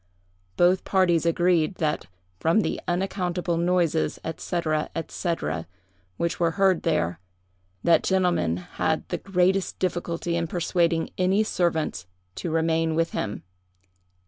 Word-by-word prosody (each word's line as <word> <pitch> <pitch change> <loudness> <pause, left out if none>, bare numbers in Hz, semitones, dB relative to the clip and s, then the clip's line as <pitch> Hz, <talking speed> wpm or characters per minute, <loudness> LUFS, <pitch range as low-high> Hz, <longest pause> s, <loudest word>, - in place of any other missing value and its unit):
Both 180 +1 +4
parties 175 -4 +2
agreed 175 0 +2
that, 155 - -1 0.3
from 165 +7 +3
the - - -2
unaccountable 180 -1 -1
noises, 170 -2 +1 0.2
&c., 180 - -3 0.5
&c., 175 -2 -2 0.8
which 170 +1 -1
were 170 -1 +2
heard 190 -2 +3
there, 85 - 0 0.6
that 170 - +5
gentleman 180 - +1
had 90 - -2
the - - -2
greatest 190 0 +1
difficulty 175 -2 -2
in 170 -1 -1
persuading 170 -1 0
any 190 +3 +3
servants 160 - -1 0.3
to 170 - -4
remain 160 0 +1
with 165 +1 +1
him. 105 - -3
170 Hz, 120 wpm, -25 LUFS, 165-180 Hz, 0.8 s, that